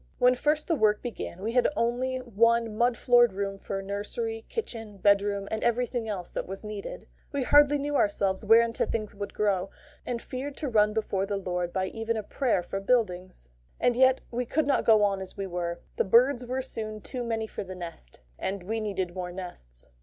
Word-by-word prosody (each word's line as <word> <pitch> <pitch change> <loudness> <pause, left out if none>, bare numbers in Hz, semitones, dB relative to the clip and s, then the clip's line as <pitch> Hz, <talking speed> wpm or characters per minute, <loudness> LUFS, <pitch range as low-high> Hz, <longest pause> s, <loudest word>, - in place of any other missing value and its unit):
When 250 0 +5
first 300 +4 0
the 330 - +2
work 215 -5 +2
began, 210 -6 -6
we 225 - -1
had 250 0 +4
only 245 +3 0
one 230 -2 +2
mud 240 +1 +2
floored 240 -3 +5
room 195 0 -3
for 195 0 -4
nursery, 450 - -4
kitchen, 225 - -5
bedroom, 200 0 +2
and 220 - -2
everything 240 -1 0
else 185 -4 -4
that - - -4
was 195 +3 -6
needed. 210 - -6 0.3
We 280 -2 -1
hardly 290 +2 +6
knew 290 +1 -2
ourselves 200 -4 +1
whereunto 230 +2 +4
things 215 -2 -3
would 200 0 -6
grow, 195 -3 +1 0.3
and 240 -1 -3
feared 270 +4 -6
to 300 - -3
run 210 -2 +3
before 200 -3 -1
the 200 0 -1
Lord 180 -2 -2
by 190 +1 0
even 225 +3 -2
a 215 - -3
prayer 225 -4 0
for 195 - -4
buildings. 185 - -1 0.3
And 245 -1 +3
yet 260 +1 +4
we 245 0 -2
could 315 +3 +1
not 280 -1 +1
go 215 -2 +6
on 195 -1 +1
as 190 - -8
we 195 - -2
were. 175 -2 -3 0.2
The - - +3
birds 245 +5 +4
were 260 +1 -2
soon 215 -4 -5
too 250 +3 -5
many 225 -1 -1
for 220 - -6
the 185 -1 -8
nest, 165 - -9 0.2
and 190 -1 -3
we 220 +4 -2
needed 190 -5 -2
more 180 -1 -4
nests. 175 - -8
215 Hz, 200 wpm, -28 LUFS, 195-245 Hz, 0.3 s, hardly